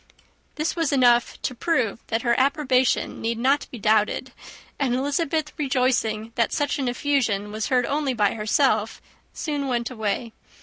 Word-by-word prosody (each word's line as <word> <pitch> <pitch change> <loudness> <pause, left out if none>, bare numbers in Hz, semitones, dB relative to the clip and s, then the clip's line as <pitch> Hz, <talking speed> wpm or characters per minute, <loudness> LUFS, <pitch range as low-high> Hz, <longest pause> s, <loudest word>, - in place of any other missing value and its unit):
This 310 +2 -1
was 330 -4 0
enough 245 -3 +3
to - - -1
prove 250 -6 0
that 225 0 -1
her 235 -1 +3
approbation 265 -2 +1
need 230 0 -1
not 270 +5 +1
be 245 - -8
doubted; 215 0 +1 0.5
and 260 -4 +1
Elizabeth, 295 +3 -1
rejoicing 250 -5 0
that 230 -3 +1
such 290 -1 -1
an 265 - -1
effusion 245 -6 0
was 215 +1 -3
heard 250 -3 +2
only 280 -2 -1
by 205 -3 +2
herself, 220 0 +1 0.3
soon 290 -3 -3
went 240 -1 -1
away. 220 0 -3
250 Hz, 150 wpm, -24 LUFS, 225-280 Hz, 0.5 s, enough